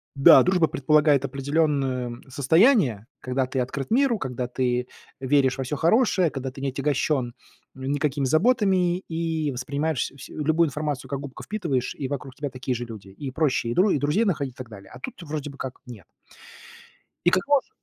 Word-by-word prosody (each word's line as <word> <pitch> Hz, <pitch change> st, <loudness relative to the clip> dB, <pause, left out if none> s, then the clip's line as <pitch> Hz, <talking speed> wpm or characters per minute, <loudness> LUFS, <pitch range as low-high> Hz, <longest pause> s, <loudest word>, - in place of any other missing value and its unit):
да, 135 Hz, -1 st, +8 dB
дружба 180 Hz, -3 st, +3 dB
предполагает 145 Hz, 0 st, +3 dB
определенное 135 Hz, -3 st, -1 dB
состояние, 140 Hz, -, +3 dB
когда 130 Hz, +1 st, -1 dB
ты 130 Hz, +1 st, -3 dB
открыт 130 Hz, -, -3 dB
миру, 255 Hz, -1 st, +3 dB
когда 125 Hz, -, -4 dB
ты 125 Hz, 0 st, -1 dB, 0.3 s
веришь 135 Hz, 0 st, +2 dB
во 135 Hz, -, -2 dB
всё 140 Hz, +4 st, -3 dB
хорошее, 185 Hz, -, +3 dB
когда 135 Hz, -1 st, -5 dB
ты 135 Hz, -, -10 dB
не 140 Hz, -, -1 dB
отягощен, 135 Hz, -2 st, -1 dB, 0.4 s
м, 130 Hz, -, -10 dB
никакими 145 Hz, -1 st, 0 dB
заботами 185 Hz, -, +2 dB
и 160 Hz, -2 st, -2 dB
воспринимаешь 140 Hz, +2 st, -2 dB
вс 135 Hz, -, -11 dB
любую 160 Hz, +2 st, +1 dB
информацию, 150 Hz, -1 st, -4 dB
как 140 Hz, -, -3 dB
губка, 140 Hz, -1 st, -9 dB
впитываешь, 170 Hz, -, -2 dB
и 135 Hz, -, -3 dB
вокруг 135 Hz, -1 st, -6 dB
тебя 145 Hz, -1 st, -4 dB
такие 130 Hz, 0 st, -3 dB
же 120 Hz, 0 st, -4 dB
люди, 105 Hz, -4 st, -10 dB
и 130 Hz, +8 st, -7 dB
проще 140 Hz, -5 st, 0 dB
и -, -, -1 dB
дру 190 Hz, -3 st, +3 dB
друзей 150 Hz, +11 st, +1 dB
находить, 140 Hz, -, -1 dB
так 125 Hz, -2 st, -9 dB
далее, 100 Hz, -3 st, -12 dB
а 125 Hz, -, -10 dB
тут -, -, -6 dB
вроде 150 Hz, -2 st, -5 dB
бы 140 Hz, -, -14 dB
как 130 Hz, -2 st, -6 dB
нет. 115 Hz, -7 st, -11 dB, 1.2 s
И -, -, +7 dB
кого 275 Hz, +10 st, +3 dB
же -, -, -34 dB
140 Hz, 180 wpm, -25 LUFS, 130-160 Hz, 1.2 s, да